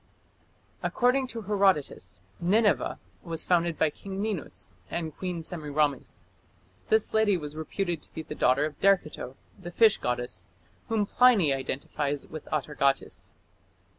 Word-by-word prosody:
According 255 +2 +2
to 230 -3 -6
Herodotus, 185 - +1 0.2
Nineveh 205 +5 +2 0.2
was 165 -2 0
founded 170 -2 +2
by 155 - +2
King 195 +4 -7
Ninus 205 -6 -4 0.2
and 160 -3 -4
Queen 180 -3 -4
Semiramis. 150 -4 -2 0.6
This 220 0 +2
lady 215 -3 +4
was 150 -2 -7
reputed 170 +1 -3
to - - -15
be 160 - -4
the - - -7
daughter 135 +4 +3
of 155 -2 -6
Derceto, 180 -9 +1 0.2
the 175 -2 -7
fish 215 +4 +5
goddess, 120 -7 -2 0.4
whom 220 -2 +1
Pliny 205 - +5
identified 140 +2 -2
with 155 -2 -7
Atargatis. 140 -2 0
165 Hz, 130 wpm, -28 LUFS, 145-200 Hz, 0.6 s, fish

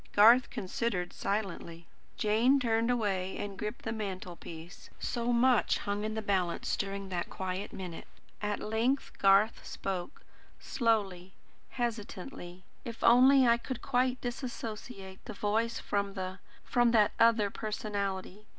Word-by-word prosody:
Garth 230 +5 +7
considered 185 -2 -2
silently. 190 -5 -3 0.3
Jane 230 +6 +3
turned 230 -2 +1
away 195 -6 0
and 200 -1 -5
gripped 210 +4 -5
the 225 - -1
mantelpiece. 180 -5 -7
So 240 0 -1
much 245 0 +3
hung 205 0 -3
in 215 0 -2
the 220 - -3
balance 185 -4 0
during 195 -1 -4
that 175 -2 -3
quiet 190 +1 -4
minute. 180 -3 -7 0.3
At 210 -1 -1
length 230 +6 0
Garth 195 +3 +4
spoke, 190 +6 -5 0.4
slowly, 195 -6 0 0.4
hesitatingly. 200 -6 -5 0.2
"If 230 -1 -7
only 260 +3 +7
I 235 0 +5
could 245 0 -6
quite 255 +1 +1
disassociate 230 -5 -6
the 220 - -6
voice 220 +3 0
from 200 -1 -2
the 185 0 -4 0.3
from 240 -1 +3
that 215 -3 +5
other 225 -3 +4
personality. 205 -1 -4
210 Hz, 130 wpm, -31 LUFS, 190-235 Hz, 0.4 s, Garth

